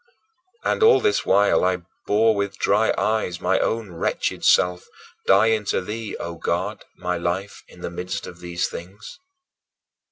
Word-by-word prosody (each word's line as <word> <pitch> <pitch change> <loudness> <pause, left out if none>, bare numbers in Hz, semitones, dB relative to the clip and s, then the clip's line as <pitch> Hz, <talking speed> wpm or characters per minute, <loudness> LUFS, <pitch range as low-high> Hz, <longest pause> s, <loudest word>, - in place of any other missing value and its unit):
And - - 0
all 450 +1 +7
this 425 -2 +1
while 100 +2 +4
I 90 -1 +1 0.2
bore 110 +2 +4
with 100 -1 -2
dry - - +2
eyes 110 -6 0
my 95 +1 +1
own 110 -4 -1
wretched 85 - -2
self 90 0 +3 0.4
dying 110 +2 +4
to - - +1
thee, 105 +3 -5
O 85 0 -5
God, - - -2
my 90 0 -2
life, 90 +4 -3
in - - -16
the - - -4
midst 90 +1 -4
of 85 - -10
these 85 0 -2
things. 95 - -10
95 Hz, 155 wpm, -23 LUFS, 90-110 Hz, 0.4 s, all